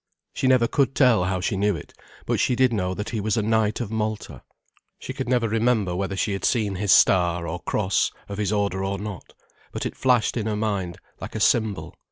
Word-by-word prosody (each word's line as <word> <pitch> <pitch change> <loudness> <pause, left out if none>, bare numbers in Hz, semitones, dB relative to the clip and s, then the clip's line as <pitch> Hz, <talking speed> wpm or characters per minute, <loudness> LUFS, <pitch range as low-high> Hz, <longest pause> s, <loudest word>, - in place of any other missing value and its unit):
She 130 - -1
never 130 -2 +4
could 135 0 +1
tell 120 -9 +4
how 95 -1 -1
she 95 - -1
knew 100 0 +1
it, 75 - -10 0.3
but - - 0
she 125 - +2
did 130 -1 +3
know 95 -3 -1
that 105 - -4
he 110 -3 -2
was 110 +2 0
a 110 - +1
knight 110 0 +1
of 115 -4 -4
Malta. 110 - -3 0.6
She - - -7
could - - -4
never 120 -2 +2
remember 110 -4 +1
whether 95 +1 -2
she 100 +1 0
had 95 - -4
seen 105 -6 +1
his 100 0 +1
star, 85 -2 +4
or 80 +3 -4
cross, 100 0 0 0.2
of 100 0 -6
his 105 -1 0
order 100 -2 0
or 100 0 -2
not, 100 -3 -8 0.4
but - - -4
it - - -4
flashed 125 -3 +2
in 110 -2 -2
her 110 - -1
mind, 100 -5 -2 0.2
like - - -8
a - - -2
symbol. 110 -4 +1
105 Hz, 225 wpm, -24 LUFS, 95-115 Hz, 0.6 s, never